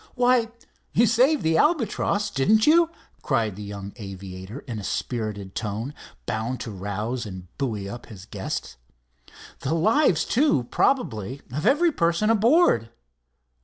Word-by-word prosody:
"Why, 245 -2 +3 0.4
you 235 - +5
saved 250 +7 +3
the 160 0 +2
Albatross, 215 - +1
didn't 215 +10 +3
you?" 330 +2 +5 0.3
cried 110 -4 0
the 105 - -8
young 100 -1 -7
aviator, 95 +2 -8
in 115 -5 -6
a - - -7
spirited 105 -4 -3
tone, 110 +5 -4 0.3
bound 115 +4 -2
to 115 - -5
rouse 105 +5 -4
and 90 -3 -10
buoy 110 -8 -2
up 120 +4 -8
his 100 -4 -11
guest. 100 - -5 0.8
"The 150 +5 -1
lives, 215 - +3
too, 250 - +2
probably, 130 - 0
of 150 +9 -1
every 320 +6 +4
person 170 - +2
aboard. 225 - +4
130 Hz, 135 wpm, -25 LUFS, -, 0.8 s, you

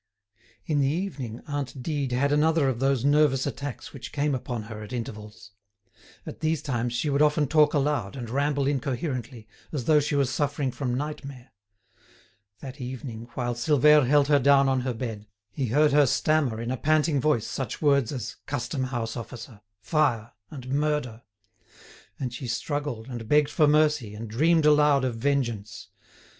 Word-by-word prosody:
In 150 -2 0
the 135 - +2
evening, 140 - -4
aunt 140 -3 -4
Dide 145 -4 -2
had 140 +3 +1
another 155 0 +3
of 125 -3 -1
those 135 -1 +1
nervous 145 -2 +3
attacks 140 -5 -6
which 135 -3 -8
came 145 0 0
upon 120 -3 -4
her 110 0 -8
at 105 +3 -9
intervals. 110 -3 -7 0.7
At - - -8
these 160 0 -1
times 120 -3 -2
she 120 +6 -1
would 140 +1 +1
often 150 -1 +3
talk 150 +1 +4
aloud 140 -8 0
and 120 -3 -6
ramble 140 +3 0
incoherently, 130 -4 -3 0.2
as 140 -6 -3
though 155 +2 +5
she 145 0 -1
was 140 -2 +1
suffering 145 -1 -1
from 125 0 -3
nightmare. 140 -2 -6 1.1
That 135 +1 -9
evening, 125 -2 -7
while 120 -1 -1
Silvère 150 +2 +4
held 145 +1 +4
her 145 -1 +4
down 140 +1 +5
on 130 -1 +1
her 125 0 -2
bed, 110 -4 -6 0.2
he 130 +5 -2
heard 145 +6 +3
her 145 -1 +5
stammer 140 -4 +1
in 115 +1 -3
a 130 - -2
panting 155 0 +2
voice 135 -7 +1
such 135 - -4
words 140 -6 +2
as 120 -5 -5
"custom 130 0 -2
house 120 -3 -3
officer," 115 -2 -9 0.2
"fire," 120 -3 0 0.2
and 130 -4 -9
"murder." 140 -5 -1 1.0
And 125 -3 -3
she 125 +1 -6
struggled, 125 -1 -3
and 120 -4 -7
begged 150 0 +3
for 150 -1 +3
mercy, 150 -7 +2
and 110 +2 -7
dreamed 155 +8 +2
aloud 150 -2 +4
of 120 -3 -2
vengeance. 120 -5 -2
135 Hz, 170 wpm, -26 LUFS, 120-150 Hz, 1.1 s, though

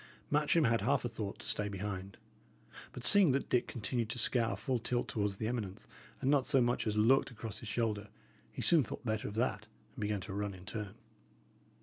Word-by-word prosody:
Matcham 150 +2 +3
had 115 0 +2
half 140 -1 +1
a - - +2
thought 110 -3 -5
to - - -9
stay 105 - +1
behind; 100 -1 -5 0.7
but, 125 - -5
seeing 195 -9 +7
that 135 - -1
Dick 125 - +2
continued 115 0 -2
to 120 - -2
scour 115 0 +2
full 130 -2 -1
tilt 120 +2 -1
towards 100 -2 -1
the 110 - -3
eminence 110 -6 -4 0.4
and 135 - +2
not 140 -3 +3
so 135 - +4
much 120 -1 +1
as 105 0 -1
looked 120 +6 +4
across 110 -3 -6
his 115 - -7
shoulder, 110 -3 -1 0.4
he - - -5
soon 165 -3 +6
thought 115 - -8
better 110 -2 -1
of 105 - -7
that, 110 -3 -1 0.3
and - - -9
began 105 -1 -1
to 100 - -7
run 100 -1 -3
in 90 0 -13
turn. 105 -2 -5
115 Hz, 210 wpm, -33 LUFS, 105-125 Hz, 0.7 s, seeing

